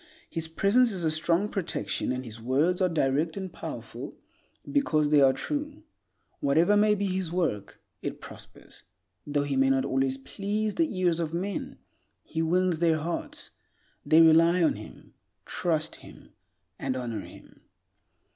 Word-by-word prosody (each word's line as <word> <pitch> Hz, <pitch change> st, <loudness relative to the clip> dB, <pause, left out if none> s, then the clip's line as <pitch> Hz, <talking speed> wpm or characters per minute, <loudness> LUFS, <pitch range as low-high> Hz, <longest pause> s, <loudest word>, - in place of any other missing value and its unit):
His 165 Hz, -1 st, -2 dB
presence 210 Hz, +9 st, +3 dB
is 185 Hz, -4 st, -3 dB
a 160 Hz, -, +2 dB
strong 170 Hz, +5 st, +1 dB
protection, 195 Hz, -9 st, -2 dB
and 130 Hz, 0 st, -3 dB
his 115 Hz, -1 st, -9 dB
words 150 Hz, +10 st, +1 dB
are 185 Hz, -, +3 dB
direct 155 Hz, +1 st, 0 dB
and 190 Hz, -3 st, -5 dB
powerful -, -, -7 dB, 0.5 s
because 155 Hz, -, +2 dB
they 150 Hz, -1 st, +5 dB
are 135 Hz, -1 st, +6 dB
true. 295 Hz, -, -4 dB, 0.6 s
Whatever 160 Hz, +8 st, +3 dB
may 210 Hz, 0 st, +4 dB
be 200 Hz, 0 st, -1 dB
his 185 Hz, -3 st, -2 dB
work, 165 Hz, -, -2 dB, 0.2 s
it -, -, -5 dB
prospers. -, -, -13 dB, 0.5 s
Though 145 Hz, 0 st, 0 dB
he 145 Hz, -1 st, -2 dB
may 135 Hz, 0 st, +3 dB
not 135 Hz, 0 st, +2 dB
always 135 Hz, 0 st, 0 dB
please 205 Hz, +9 st, -3 dB
the 330 Hz, -2 st, +1 dB
ears 175 Hz, -2 st, +2 dB
of 165 Hz, -1 st, -2 dB
men, 190 Hz, +2 st, -4 dB, 0.5 s
he 160 Hz, -, -3 dB
wins 175 Hz, 0 st, +1 dB
their 165 Hz, -2 st, +3 dB
hearts; 165 Hz, +2 st, -4 dB, 0.5 s
they 155 Hz, +3 st, +6 dB
rely 165 Hz, +2 st, +6 dB
on 160 Hz, -, +4 dB
him, -, -, -12 dB, 0.3 s
trust, 160 Hz, -3 st, -2 dB
and 90 Hz, +8 st, -9 dB
honor 120 Hz, -3 st, -4 dB
him. -, -, -14 dB
165 Hz, 150 wpm, -28 LUFS, 135-185 Hz, 0.6 s, are